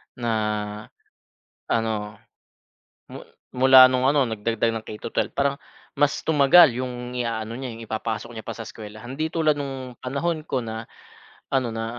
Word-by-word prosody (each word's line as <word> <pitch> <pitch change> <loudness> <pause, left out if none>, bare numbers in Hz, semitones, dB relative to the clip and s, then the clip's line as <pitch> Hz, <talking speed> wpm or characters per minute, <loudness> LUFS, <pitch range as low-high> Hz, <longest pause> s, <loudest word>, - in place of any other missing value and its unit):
na 120 -1 -3 1.4
ano. 110 -2 -1 0.9
Mu - - -10 0.3
mula 130 0 +8
nung 130 0 +1
ano 140 -3 +3
nagdagdag 115 +1 -1
ng 110 - -4
K-12 105 -1 -3
parang 140 0 0 0.4
mas 145 0 +1
tumagal 150 -1 +6
yung 125 -1 -5
iaano 115 -2 -3
niya 130 0 -5
yung 115 0 -9
ipapasok 110 +1 -4
niya 110 - -7
pa - - -7
sa 115 -2 -7
eskwelahan. 110 +3 -9
Hindi 155 +3 -2
tulad 155 -3 +2
nung 135 -3 -6
panahon 155 +5 -2
ko 135 -4 -2
na 110 -1 -6 0.6
ano 130 -4 0
na 115 0 -3
125 Hz, 145 wpm, -24 LUFS, 115-135 Hz, 1.4 s, mula